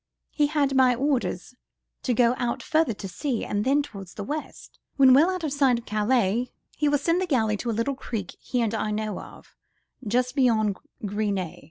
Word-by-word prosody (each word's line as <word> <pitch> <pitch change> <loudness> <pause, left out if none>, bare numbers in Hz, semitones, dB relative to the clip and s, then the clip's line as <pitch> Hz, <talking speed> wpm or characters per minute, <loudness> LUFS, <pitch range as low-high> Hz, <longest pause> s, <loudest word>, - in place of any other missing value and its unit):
He 295 -1 +2
had 285 -2 +1
my 255 -2 +5
orders 255 -6 -1 0.5
to 250 - 0
go 240 +1 +4
out 240 -1 -2
further 315 -8 +1
to 195 - -7
sea, 245 +5 -3
and 205 0 -1
then 280 +4 +2
towards 195 -10 -10
the 205 - -5
west. 300 +8 -7 0.2
When 265 -2 +7
well 300 +7 +6
out 370 -2 -3
of 300 -3 -1
sight 270 -4 +3
of 235 - -9
Calais, 220 +2 +1 0.3
he 295 -1 +1
will 290 - +3
send 335 +5 +1
the 375 - -1
galley 220 -8 +1
to 235 - -4
a 220 - -1
little 230 +5 0
creek 225 -8 -5
he 250 - -2
and 225 -1 -1
I 215 -1 -1
know 210 -1 -2
of, - - -13 0.5
just 250 +3 +1
beyond 220 -7 +2 0.3
Gris 205 +1 -1
Nez. 185 -4 -4
245 Hz, 205 wpm, -25 LUFS, 215-280 Hz, 0.5 s, When